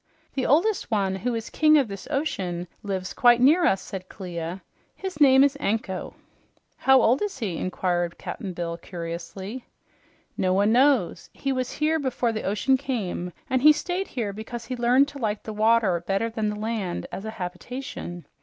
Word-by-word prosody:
"The 265 - -1
oldest 345 - +2
one, 195 -4 0
who 235 +5 -2
is 225 0 -5
king 310 0 +5
of 275 -5 +3
this 195 -2 -8
ocean, 185 - -2
lives 190 -2 -3
quite 240 -1 +5
near 310 +8 +5
us," 190 - +1
said 185 -1 -7
Clia. 175 -1 -6 0.3
"His 380 -4 -6
name 265 -1 +7
is 285 0 +3
Anko." 200 -6 -2 0.6
"How 265 0 +5
old 250 +2 +3
is 415 -6 -2
he?" 200 -10 -3
inquired 175 -2 -1
Cap'n 190 -3 -6
Bill 170 -1 -4
curiously. 175 +7 -7 0.7
"No 185 -1 +1
one 200 +3 +3
knows. 255 -5 +3
He 275 - -2
was 255 -1 -2
here 310 +2 +1
before 255 -4 0
the 220 - -3
ocean 215 +7 +2
came, 210 -10 -3 0.2
and 260 -1 +1
he 305 +3 +9
stayed 355 +5 -2
here 215 -5 -3
because 230 +3 -7
he 255 - -4
learned 250 +3 +4
to 285 - -10
like 215 -3 -2
the 220 - -6
water 215 -4 +3
better 195 +6 -1
than 220 -1 -1
the 210 - -3
land 215 -5 -3
as 195 - -6
a 220 - -4
habitation. 180 -1 -6
220 Hz, 180 wpm, -25 LUFS, 190-265 Hz, 0.7 s, he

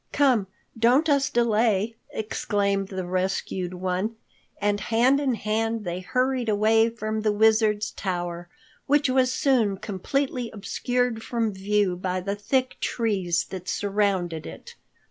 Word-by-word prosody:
"Come, 255 -9 +3 0.3
don't 245 +7 +3
let 290 - +5
us 275 0 -1
delay," 225 -2 +2 0.2
exclaimed 200 -2 -1
the 190 -2 -4
rescued 185 0 -2
one, 185 +5 -2 0.4
and 205 0 +1
hand 235 +6 +3
in 270 -4 +1
hand 225 +1 -1
they 175 +1 -3
hurried 255 +4 0
away 220 +2 +4
from 215 -1 -3
the 215 0 +2
Wizard's 215 0 +3
tower, 175 -2 -4 0.4
which 290 -2 +3
was 255 -1 +3
soon 245 -7 +2
completely 245 +6 -2
obscured 245 +2 -1
from 225 -2 -1
view 195 -1 +1
by 185 0 -2
the 200 +2 -3
thick 255 +5 -1
trees 190 -7 0
that 185 -1 -6
surrounded 195 -5 -1
it. 80 - -10
215 Hz, 135 wpm, -25 LUFS, 190-235 Hz, 0.4 s, let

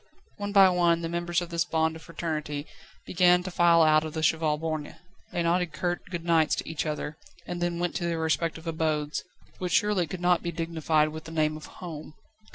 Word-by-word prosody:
One 205 0 -4
by 195 -1 +8
one 170 -2 +2
the 165 - -2
members 175 +1 -1
of 175 - -6
this 170 0 +1
bond 160 -2 0
of 160 - -10
Fraternity 155 -4 -4 0.4
began 180 0 +4
to 185 - -5
file 170 -1 +5
out 155 0 +5
of 155 0 -6
the 160 - -2
Cheval 160 -1 +2
Borgne. 155 -1 -4 0.4
They 175 - -1
nodded 170 -1 +1
curt 175 -1 -2
good 170 -2 -5
nights 165 -2 +3
to - - -5
each 160 0 -3
other, 150 0 -4 0.3
and 175 -1 -5
then 175 0 0
went 175 0 -1
to 175 - -3
their 170 -1 -1
respective 160 +1 -1
abodes, 150 -3 -1 0.4
which 180 -1 -2
surely 205 -5 +2
could 180 +4 -6
not 175 0 +3
be 170 - -3
dignified 160 -2 +1
with 155 +1 -8
the 165 - -8
name 155 -1 +1
of 155 - -9
home. 155 -3 -9
165 Hz, 210 wpm, -27 LUFS, 155-175 Hz, 0.4 s, by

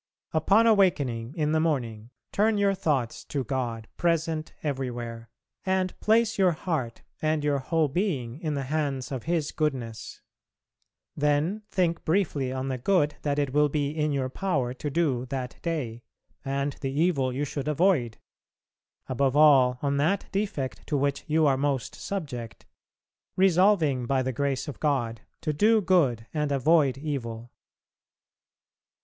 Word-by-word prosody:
Upon 200 +8 +4
awakening 145 - +2
in 150 -1 +1
the 160 - +2
morning, 120 -9 -1 0.2
turn 215 +1 +2
your 200 -1 +3
thoughts 140 -10 -1
to 140 -2 -2
God 120 -3 -3
present 165 -2 0
everywhere, 120 -5 -4 0.3
and 190 -1 0
place 225 0 +2
your 185 -3 +4
heart 155 -8 -3 0.2
and 155 -1 0
your 145 -1 +1
whole 160 +3 +1
being 140 - -2
in 155 -3 -2
the 140 - -2
hands 140 -2 -2
of 130 -4 -4
His 165 -3 0
goodness. 130 -8 -3 1.0
Then 150 +8 +1
think 175 -4 0
briefly 155 -7 0
on 130 0 -3
the 130 -2 -2
good 150 0 +2
that 145 -1 -1
it 140 -3 0
will 150 0 +4
be 145 -1 -1
in 150 -1 -1
your 135 -2 0
power 135 -5 -1
to 145 +3 -4
do 135 -5 0
that 130 -1 -5
day, 130 -9 -3 0.4
and 140 +1 -1
the 135 - -1
evil 140 -3 +1
you 140 +4 -2
should 140 0 -5
avoid, 150 - +2 0.9
above 135 +1 +1
all 135 -5 +6
on 140 0 +1
that 165 +8 +1
defect 195 -10 -3
to 145 - 0
which 140 0 -1
you 155 +1 +3
are 135 -2 +3
most 135 -3 -1
subject, 140 - -6 0.7
resolving 180 - +3
by 135 0 +1
the 130 0 -2
grace 140 +2 -1
of 145 - -7
God 120 -7 0 0.2
to 155 - -1
do 215 +9 +4
good 155 - +2
and 150 -2 -1
avoid 140 -1 +3
evil. 120 -6 -5
145 Hz, 150 wpm, -27 LUFS, 130-165 Hz, 1.0 s, all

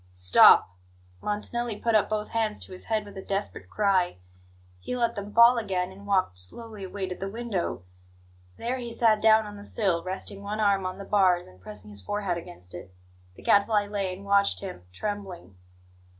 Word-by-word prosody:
"Stop!" 90 0 +6 0.5
Montanelli 215 +2 -2
put 230 +1 0
up 215 -2 +3
both 215 0 -2
hands 220 -2 -1
to - - -7
his 185 - -8
head 220 -2 -1
with 205 -1 -12
a - - -6
desperate 200 +1 -4
cry. 190 - +1 0.6
He 250 - -4
let 235 -1 +1
them 205 -2 -6
fall 235 +2 +7
again, 190 -4 -2
and 200 +2 -13
walked 185 - +1
slowly 215 - -4
away 190 +1 -4
to 185 - -4
the 195 +2 -5
window. 210 - -3 0.7
There 245 +3 -2
he 240 -1 -6
sat 225 -2 +3
down 220 0 +5
on 205 0 -9
the 205 - -10
sill, 190 -6 0
resting 190 +1 -5
one 205 +2 -4
arm 200 -3 +2
on 185 0 -6
the 200 - -8
bars, 185 -4 +3
and 90 0 -17
pressing 105 +1 -8
his 100 -1 -4
forehead 195 - -2
against 90 - -11
it. 90 +2 -9 0.4
The - - -15
Gadfly 205 0 +3
lay 200 -2 -2
and 190 +2 -9
watched 200 0 +3
him, 185 - -8
trembling. 185 - -6
200 Hz, 190 wpm, -27 LUFS, 180-215 Hz, 0.7 s, fall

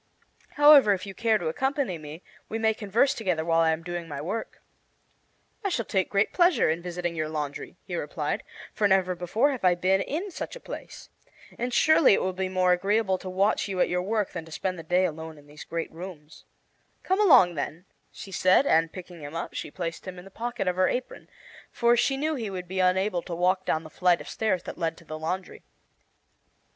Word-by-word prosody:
However, 290 -7 +7
if 185 0 -4
you 195 - -7
care 225 0 +2
to 175 - -4
accompany 265 - -1
me, 155 +3 -10 0.3
we 225 - -2
may 220 0 +2
converse 220 +6 +1
together 180 -7 -1
while 165 0 +3
I 165 - +4
am 160 +1 -1
doing 175 -1 -5
my 145 -3 -6
work." 195 +10 -5 1.0
"I 395 - 0
shall 235 - -1
take 190 -2 0
great 200 +1 +1
pleasure 345 - +4
in 165 +2 -2
visiting 175 -1 -4
your 155 -1 -2
laundry," 150 -2 -5
he - - -5
replied, - - -3 0.3
"for 210 - +2
never 190 -2 +2
before 180 +11 +1
have 260 -6 -5
I 180 -1 +5
been 190 +2 +2
in 355 - -3
such - - -6
a - - -9
place. - - -9 0.5
And 245 +1 -3
surely 310 -2 +5
it - - -1
will 185 - -1
be 190 0 -2
more 185 -1 +2
agreeable 195 +1 +1
to 185 - -7
watch 195 +4 +1
you 190 -2 -4
at - - +3
your 180 0 0
work 210 +1 -1
than 170 - -5
to 160 - -14
spend 185 +2 -3
the - - -7
day 180 +3 +2
alone 160 -1 -5
in 145 - -17
these 150 +1 -11
great 165 0 -4
rooms." 160 -3 -10 0.6
"Come 375 +3 +1
along, 240 - +6
then," 155 +3 -5 0.3
she 195 - -10
said, 185 +7 +4
and 165 - +3
picking 180 -2 -10
him 145 +2 -8
up 165 - -4
she - - -5
placed 165 +2 -5
him 185 -1 -7
in 180 - -10
the 195 - -13
pocket 240 -1 -4
of 180 0 0
her 185 - +4
apron, 250 0 -5 0.4
for 235 0 +3
she 270 +3 +1
knew 310 +3 0
he 230 -8 -3
would 180 -2 -6
be 190 +1 -4
unable 185 0 +2
to 170 - -6
walk 185 +2 +1
down 160 - 0
the 155 - -10
flight 180 0 +2
of - - -10
stairs 190 -5 -1
that - - -8
led 165 -1 -1
to 170 - -16
the 155 0 -7
laundry. 180 +4 -4
185 Hz, 220 wpm, -26 LUFS, 170-220 Hz, 1.0 s, However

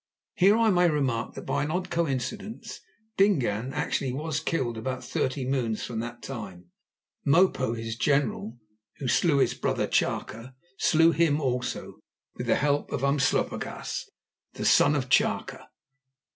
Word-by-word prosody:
Here 205 0 +4
I 225 -2 +4
may 175 -1 +4
remark 135 -7 -1
that - - -8
by - - 0
an 145 - -3
odd 180 +3 -2
coincidence 170 - -3 0.4
Dingaan 130 - +2
actually 135 -1 -1
was 150 +3 -2
killed 125 -8 -1
about 130 +3 -4
thirty 130 0 -2
moons 120 -5 -1
from 115 -2 -4
that 120 +1 -6
time. 95 -9 -8 0.5
Mopo, 140 -6 +3
his 115 0 -4
general, 140 -4 0 0.4
who 135 - -4
slew 150 +3 +3
his 135 - +3
brother - - -1
Chaka, 115 +4 -2 0.2
slew 165 +1 +5
him 165 -3 +2
also 125 -3 -3 0.3
with - - -6
the - - +4
help 145 0 0
of 130 - -2
Umslopogaas, 140 -1 -1 0.4
the - - -5
son 145 - +5
of 130 -3 -1
Chaka. 130 - 0
135 Hz, 145 wpm, -27 LUFS, 120-160 Hz, 0.5 s, slew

